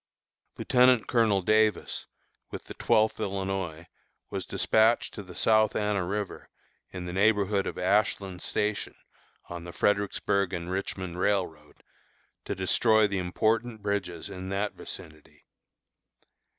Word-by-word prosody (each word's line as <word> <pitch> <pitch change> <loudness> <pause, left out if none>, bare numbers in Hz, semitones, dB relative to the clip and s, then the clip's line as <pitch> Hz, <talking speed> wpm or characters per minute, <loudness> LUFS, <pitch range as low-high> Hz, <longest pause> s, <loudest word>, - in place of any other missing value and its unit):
Lieutenant 125 -2 +4
Colonel 110 -6 +2
Davis, 110 0 +1 0.4
with - - -7
the - - -9
Twelfth 110 -2 +2
Illinois, 95 -5 -3 0.5
was - - -4
despatched 110 +2 +2
to 105 - -6
the 90 -3 -12
South 110 +3 +3
Anna 105 -3 0
River, 100 +1 -4 0.4
in 90 -1 -6
the 90 - -5
neighborhood 100 0 +2
of - - -5
Ashland 95 -1 0
Station, 105 0 -2 0.5
on 85 -1 -7
the 85 - -8
Fredericksburg 100 0 0
and 85 0 -4
Richmond 95 -2 -4
Railroad, 90 -7 -2 0.6
to - - -3
destroy 110 +4 +3
the 100 -2 -1
important 110 +5 0
bridges 95 -5 -2
in 95 -2 -7
that 100 +2 -1
vicinity. 75 -1 -9
100 Hz, 125 wpm, -28 LUFS, 90-110 Hz, 0.6 s, Lieutenant